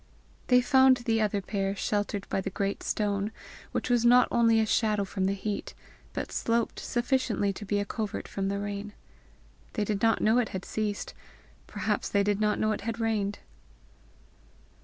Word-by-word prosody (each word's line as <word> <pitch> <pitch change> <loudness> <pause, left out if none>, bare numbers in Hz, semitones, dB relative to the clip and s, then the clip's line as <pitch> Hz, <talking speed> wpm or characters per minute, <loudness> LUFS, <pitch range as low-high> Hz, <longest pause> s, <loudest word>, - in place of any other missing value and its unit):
They 250 0 +6
found 265 0 +5
the 230 -2 0
other 205 -2 0
pair 195 0 -2
sheltered 205 0 -2
by 195 - -1
the 195 - -3
great 195 +1 -2
stone, 205 0 -1 0.4
which - - -2
was 245 -2 +2
not 245 +1 +6
only 230 -1 +4
a 220 - +3
shadow 215 -2 +1
from 190 0 -2
the 195 +1 +1
heat, 200 +1 -4 0.4
but - - -4
sloped 230 0 0
sufficiently 240 -5 0
to 205 - -8
be 205 +1 0
a 205 - -1
covert 215 0 -4
from 195 -1 -3
the 200 0 -1
rain. 205 +1 -5 0.8
They 215 - 0
did 205 -1 -2
not 225 0 +3
know 225 +3 +3
it 240 - 0
had 185 - -8
ceased; 210 -2 -3 0.5
perhaps - - -2
they 200 0 +2
did 205 0 0
not 210 -1 +2
know 215 - +1
it - - -2
had 230 +1 -4
rained. 215 -3 0
210 Hz, 180 wpm, -28 LUFS, 200-230 Hz, 0.8 s, They